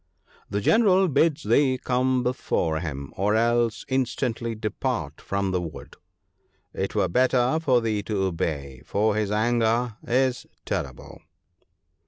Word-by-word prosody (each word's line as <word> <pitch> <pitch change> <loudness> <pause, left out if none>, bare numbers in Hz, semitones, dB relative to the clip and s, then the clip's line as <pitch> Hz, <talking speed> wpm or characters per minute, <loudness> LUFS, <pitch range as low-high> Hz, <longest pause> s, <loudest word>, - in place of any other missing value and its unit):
The 100 +1 -1
General 195 - +4
bids 155 +1 +2
thee 130 -3 +3
come 125 0 +1
before 85 -10 -1
him, 70 -4 -6
or 105 +3 +1
else 115 0 +1
instantly 125 -3 -1
depart 110 -1 -3
from 100 -1 -2
the 90 -1 0
wood. 80 -4 -8 0.8
It - - -3
were - - +2
better 130 - +2
for 130 -7 +2
thee 110 -2 -1
to 100 -2 -2
obey, 70 -7 -3
for 105 +1 +1
his 105 -2 0
anger 115 +1 +1
is 130 +1 0 0.2
terrible.' 65 -2 -5
115 Hz, 130 wpm, -25 LUFS, 100-130 Hz, 0.8 s, General